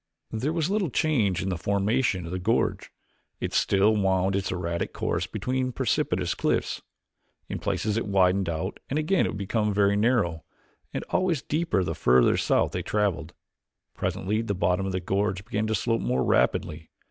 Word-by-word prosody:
There 120 Hz, +7 st, -1 dB
was 165 Hz, +2 st, -1 dB
little 200 Hz, -5 st, +1 dB
change 120 Hz, -, +1 dB
in 95 Hz, -, -2 dB
the 90 Hz, -3 st, -2 dB
formation 100 Hz, -1 st, 0 dB
of 85 Hz, -, -7 dB
the 95 Hz, -, -2 dB
gorge; 105 Hz, +6 st, 0 dB, 0.5 s
it -, -, -3 dB
still 100 Hz, +3 st, +3 dB
wound 95 Hz, -1 st, +1 dB
its 100 Hz, -1 st, -1 dB
erratic 85 Hz, -2 st, -3 dB
course -, -, -1 dB
between 130 Hz, 0 st, -2 dB
precipitous -, -, 0 dB
cliffs. -, -, -1 dB, 0.7 s
In -, -, -4 dB
places 105 Hz, 0 st, -1 dB
it 115 Hz, -, -2 dB
widened 95 Hz, -1 st, +2 dB
out 85 Hz, +4 st, -3 dB
and 140 Hz, -, -1 dB
again 160 Hz, +5 st, +2 dB
it -, -, -4 dB
became 105 Hz, +2 st, 0 dB
very 100 Hz, 0 st, +3 dB
narrow 105 Hz, -7 st, +1 dB, 0.5 s
and -, -, -3 dB
always 180 Hz, -6 st, +1 dB
deeper 155 Hz, -, 0 dB
the -, -, -2 dB
further 60 Hz, 0 st, +4 dB
south -, -, +2 dB
they -, -, -2 dB
traveled. 90 Hz, -6 st, -1 dB, 0.6 s
Presently 105 Hz, +4 st, -1 dB
the 100 Hz, -3 st, -2 dB
bottom 90 Hz, +2 st, +1 dB
of -, -, -2 dB
the 95 Hz, -, -1 dB
gorge 95 Hz, +1 st, -1 dB
began 110 Hz, 0 st, -1 dB
to 110 Hz, -, +1 dB
slope 115 Hz, +3 st, 0 dB
more 65 Hz, +1 st, 0 dB
rapidly. 75 Hz, +5 st, +1 dB
100 Hz, 170 wpm, -26 LUFS, 90-115 Hz, 0.7 s, further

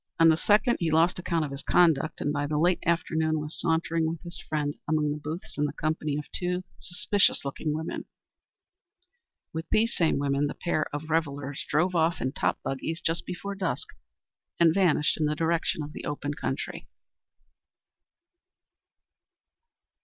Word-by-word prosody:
On 165 Hz, 0 st, +7 dB
the 160 Hz, -, +6 dB
second, 210 Hz, +7 st, +3 dB
he 170 Hz, -, +1 dB
lost 165 Hz, +3 st, +3 dB
account 170 Hz, -3 st, 0 dB
of 140 Hz, -, -6 dB
his 140 Hz, +1 st, -5 dB
conduct, 160 Hz, -3 st, +3 dB
and 145 Hz, -, 0 dB
by 145 Hz, -1 st, -1 dB
the 150 Hz, 0 st, -1 dB
late 175 Hz, +3 st, +3 dB
afternoon 160 Hz, -2 st, +1 dB
was 150 Hz, +1 st, -5 dB
sauntering 165 Hz, -1 st, +1 dB
with 165 Hz, 0 st, -4 dB
his 170 Hz, -1 st, -5 dB
friend 150 Hz, -2 st, -2 dB
among 150 Hz, -1 st, +1 dB
the 150 Hz, -, -2 dB
booths 155 Hz, +2 st, -6 dB
in 150 Hz, -, +3 dB
the -, -, -2 dB
company 155 Hz, -1 st, -1 dB
of 150 Hz, -, -4 dB
two 180 Hz, 0 st, -1 dB, 0.2 s
suspicions 185 Hz, -1 st, +1 dB
looking 140 Hz, +2 st, -2 dB
women. 160 Hz, +2 st, -3 dB, 1.5 s
With 160 Hz, 0 st, -5 dB
these 230 Hz, +2 st, +2 dB
same 165 Hz, -2 st, +2 dB
women 140 Hz, +1 st, +1 dB
the -, -, -5 dB
pair 155 Hz, -3 st, -1 dB
of 150 Hz, +2 st, -5 dB
revellers 145 Hz, -3 st, -1 dB
drove 175 Hz, +5 st, +2 dB
off 165 Hz, 0 st, +2 dB
in 130 Hz, +2 st, -1 dB
top -, -, 0 dB
buggies 160 Hz, +5 st, -3 dB
just 165 Hz, +1 st, -1 dB
before 200 Hz, +3 st, -4 dB
dusk, 190 Hz, -3 st, -2 dB, 0.7 s
and 165 Hz, -2 st, +6 dB
vanished 170 Hz, -6 st, +3 dB
in 155 Hz, -, +2 dB
the 150 Hz, -, 0 dB
direction 165 Hz, 0 st, 0 dB
of 150 Hz, +1 st, -8 dB
the -, -, -7 dB
open 145 Hz, 0 st, -3 dB
country. -, -, -4 dB
160 Hz, 165 wpm, -28 LUFS, 150-170 Hz, 1.5 s, On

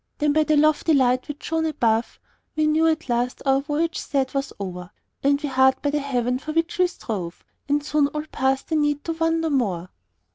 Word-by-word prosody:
Then 295 Hz, -1 st, +1 dB
by 310 Hz, +1 st, +4 dB
the 305 Hz, -1 st, +3 dB
lofty 310 Hz, +1 st, +3 dB
light 255 Hz, -1 st, +2 dB
which 295 Hz, -1 st, -7 dB
shone 320 Hz, 0 st, 0 dB
above, 235 Hz, -7 st, 0 dB, 0.4 s
We 310 Hz, 0 st, +2 dB
knew 315 Hz, +1 st, +3 dB
at 320 Hz, 0 st, 0 dB
last 245 Hz, 0 st, -1 dB
our 270 Hz, 0 st, +3 dB
voyage 310 Hz, +3 st, -1 dB
sad 270 Hz, -2 st, -1 dB
was 275 Hz, 0 st, -2 dB
o'er, 180 Hz, -2 st, -6 dB, 0.3 s
And 280 Hz, +1 st, +2 dB
we 295 Hz, -, -3 dB
hard 265 Hz, 0 st, +3 dB
by 285 Hz, -, +1 dB
the 295 Hz, -, 0 dB
haven 250 Hz, -3 st, -1 dB
for 310 Hz, +3 st, -6 dB
which 330 Hz, +2 st, -1 dB
we 365 Hz, -, +5 dB
strove, 195 Hz, -, -6 dB, 0.2 s
And 290 Hz, 0 st, +1 dB
soon 300 Hz, -1 st, +2 dB
all 300 Hz, +1 st, -5 dB
past 265 Hz, 0 st, 0 dB
the 320 Hz, -, 0 dB
need 295 Hz, -1 st, +1 dB
to 330 Hz, -, -2 dB
wander 325 Hz, 0 st, 0 dB
more. 190 Hz, -10 st, -1 dB
285 Hz, 210 wpm, -23 LUFS, 255-310 Hz, 0.4 s, we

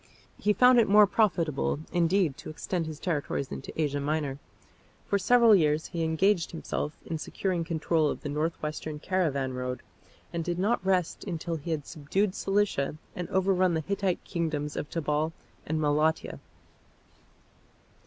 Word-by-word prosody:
He 210 Hz, -, +2 dB
found 250 Hz, +3 st, +6 dB
it 225 Hz, -, +3 dB
more 210 Hz, +1 st, +8 dB
profitable, 175 Hz, -, +1 dB
indeed, 175 Hz, -3 st, +2 dB
to -, -, -9 dB
extend 165 Hz, +2 st, -3 dB
his 155 Hz, -1 st, -7 dB
territories 145 Hz, -5 st, -2 dB
into 135 Hz, -, -6 dB
Asia 145 Hz, -2 st, 0 dB
Minor. 145 Hz, -1 st, -2 dB, 0.7 s
For 200 Hz, -, +1 dB
several 230 Hz, +2 st, +6 dB
years 155 Hz, -3 st, +2 dB
he 170 Hz, -2 st, -3 dB
engaged 165 Hz, +3 st, +2 dB
himself 155 Hz, -2 st, -4 dB
in 160 Hz, -, -3 dB
securing 180 Hz, +2 st, -2 dB
control 160 Hz, -1 st, +1 dB
of -, -, -4 dB
the -, -, -5 dB
north 155 Hz, +3 st, -1 dB
western 150 Hz, 0 st, -4 dB
caravan 150 Hz, -6 st, 0 dB
road, 125 Hz, 0 st, -4 dB, 0.5 s
and 170 Hz, -1 st, -1 dB
did 175 Hz, +1 st, -2 dB
not 200 Hz, +3 st, +1 dB
rest 185 Hz, -3 st, 0 dB
until 170 Hz, -3 st, -3 dB
he 155 Hz, +3 st, -8 dB
had 155 Hz, -3 st, -2 dB
subdued 185 Hz, +6 st, -1 dB
Cilicia 195 Hz, -10 st, 0 dB, 0.2 s
and 180 Hz, -1 st, -4 dB
overrun 185 Hz, -2 st, +2 dB
the 160 Hz, -, 0 dB
Hittite 195 Hz, +1 st, -1 dB
kingdoms 155 Hz, -4 st, -2 dB
of 150 Hz, -, -4 dB
Tabal 155 Hz, 0 st, -1 dB, 0.3 s
and 155 Hz, +1 st, 0 dB
Malatia. 155 Hz, +1 st, +1 dB
165 Hz, 155 wpm, -28 LUFS, 150-190 Hz, 0.7 s, more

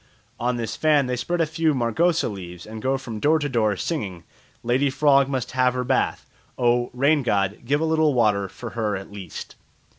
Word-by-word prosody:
On 125 Hz, +1 st, 0 dB
this 115 Hz, -2 st, -3 dB
fan 150 Hz, -3 st, +3 dB
they 125 Hz, 0 st, -1 dB
spread 175 Hz, +7 st, -1 dB
a -, -, +3 dB
few 155 Hz, -1 st, 0 dB
margosa 160 Hz, +8 st, +1 dB
leaves 90 Hz, -4 st, -8 dB
and 110 Hz, 0 st, -8 dB
go 135 Hz, +2 st, +1 dB
from 115 Hz, -5 st, -7 dB
door 155 Hz, +7 st, +3 dB
to 145 Hz, -2 st, -2 dB
door 110 Hz, -6 st, +1 dB
singing, 95 Hz, -, -4 dB, 0.4 s
"Lady 130 Hz, +4 st, +2 dB
frog 140 Hz, 0 st, +4 dB
must 130 Hz, -3 st, -2 dB
have 125 Hz, -1 st, +2 dB
her 125 Hz, -, -1 dB
bath. 130 Hz, +1 st, 0 dB, 0.3 s
Oh! 120 Hz, 0 st, +2 dB
rain 140 Hz, +4 st, +2 dB
god, 100 Hz, -5 st, 0 dB
give 145 Hz, +4 st, +1 dB
a -, -, +2 dB
little 160 Hz, -3 st, +2 dB
water 105 Hz, -5 st, +2 dB
for 115 Hz, +5 st, -8 dB
her 110 Hz, -3 st, -1 dB
at 95 Hz, +1 st, -8 dB
least." 100 Hz, -3 st, -8 dB
125 Hz, 200 wpm, -23 LUFS, 110-145 Hz, 0.4 s, frog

